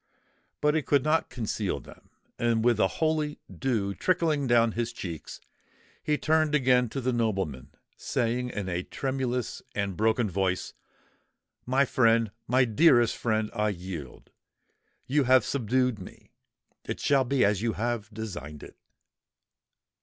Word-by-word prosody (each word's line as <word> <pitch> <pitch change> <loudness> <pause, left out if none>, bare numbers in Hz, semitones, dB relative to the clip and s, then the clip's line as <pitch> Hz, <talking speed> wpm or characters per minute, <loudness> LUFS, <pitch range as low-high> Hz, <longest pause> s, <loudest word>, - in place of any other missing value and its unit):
But 150 0 +3
he 160 - +2
could 140 -2 +2
not 155 +1 +1
conceal 105 - -2
them; - - -16 0.3
and 115 -1 +1
with 120 -3 +4
the 95 - +3
holy 155 +3 -1 0.2
dew 110 -7 -1
trickling 160 - +1
down 115 -1 +4
his 115 +1 -2
cheeks, 85 -8 -7 0.6
he 150 -1 +1
turned 155 -1 +2
again 125 -3 +3
to 135 - -4
the 130 0 0
nobleman, 95 - -2 0.3
saying 120 +2 -1
in 105 -5 -4
a 90 -1 -1
tremulous 130 +1 -3
and 100 -2 -2
broken 110 +2 +2
voice,—"My 95 +7 -4
friend—my 115 +1 +2
dearest 120 -1 +4
friend, 110 -2 -1
I 105 -2 +1
yield!—you 95 - -6
have 130 -2 +5
subdued 125 -2 0
me! 90 - -13 0.5
It - - -5
shall 140 -1 +3
all 130 - +1
be 130 -1 +2
as 100 -1 +1
you 115 -1 0
have 115 0 -2
designed 100 -9 -7
it!" - - -13
120 Hz, 135 wpm, -27 LUFS, 105-130 Hz, 0.6 s, have